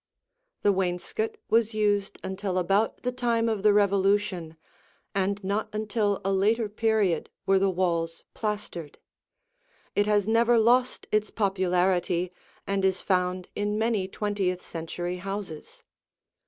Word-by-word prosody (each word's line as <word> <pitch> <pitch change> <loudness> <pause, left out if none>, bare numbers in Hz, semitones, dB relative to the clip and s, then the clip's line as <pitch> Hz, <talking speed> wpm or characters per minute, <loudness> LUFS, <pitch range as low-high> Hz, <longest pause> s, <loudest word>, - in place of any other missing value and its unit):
The 205 - +5
wainscot 190 - -2
was 225 0 +3
used 205 -2 +1
until 190 -1 -3
about 195 +5 +1
the 250 - 0
time 235 -2 0
of 220 -3 0
the 210 +1 +5
Revolution 195 -4 +2 0.6
and 200 +1 -1
not 200 +3 -1
until 210 -1 0
a 195 - +2
later 215 +4 +2
period 210 -6 +1 0.2
were 195 0 +4
the 195 0 +3
walls 170 -3 -1
plastered. 210 -8 -4 1.0
It 205 0 +2
has 205 -1 +2
never 230 +1 +4
lost 245 +3 +3
its 215 0 +1
popularity 180 -3 +1 0.3
and 195 -1 -1
is 190 -1 +2
found 180 -1 0
in 205 +1 -1
many 220 -4 +1
twentieth 195 -3 -2
century 175 +2 -4
houses. 195 -4 -7
200 Hz, 125 wpm, -27 LUFS, 185-215 Hz, 1.0 s, The